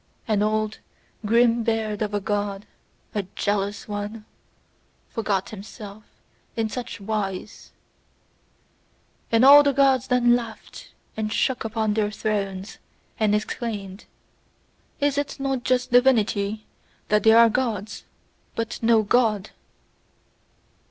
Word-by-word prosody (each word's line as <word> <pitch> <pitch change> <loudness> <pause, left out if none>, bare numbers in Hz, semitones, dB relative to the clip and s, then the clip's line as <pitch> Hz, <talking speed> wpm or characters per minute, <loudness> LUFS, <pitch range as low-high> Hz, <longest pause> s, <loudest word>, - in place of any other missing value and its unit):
An 215 -2 +1
old 215 0 0 0.5
grim 235 +1 +4
beard 220 -2 -1
of 210 -1 -1
a - - +1
God, 205 0 -3 0.5
a 210 - 0
jealous 205 0 -2
one, 210 +1 -5 0.8
forgot 200 -4 -2
himself 210 0 -10 0.5
in 225 -1 -1
such 245 -1 -6
wise: 200 -1 -4 1.6
And 230 +2 +5
all 285 +2 +10
the 285 -1 +2
Gods 265 -2 +3
then 240 -1 +4
laughed, 230 -2 -7 0.2
and 215 -1 -3
shook 260 +3 0
upon 220 -1 -1
their 210 -1 0
thrones, 200 -2 -3 0.4
and 210 -1 +3
exclaimed: 210 -2 -4 0.9
"Is 285 -1 +1
it 285 0 -4
not 270 -2 -2
just 255 -1 0
divinity 220 -4 +2 0.4
that 210 0 +3
there 220 +2 +6
are 230 0 +7
Gods, 220 -4 -2 0.5
but 230 -1 -4
no 225 -1 +4
God?" 215 -2 +1
220 Hz, 115 wpm, -24 LUFS, 205-240 Hz, 1.6 s, all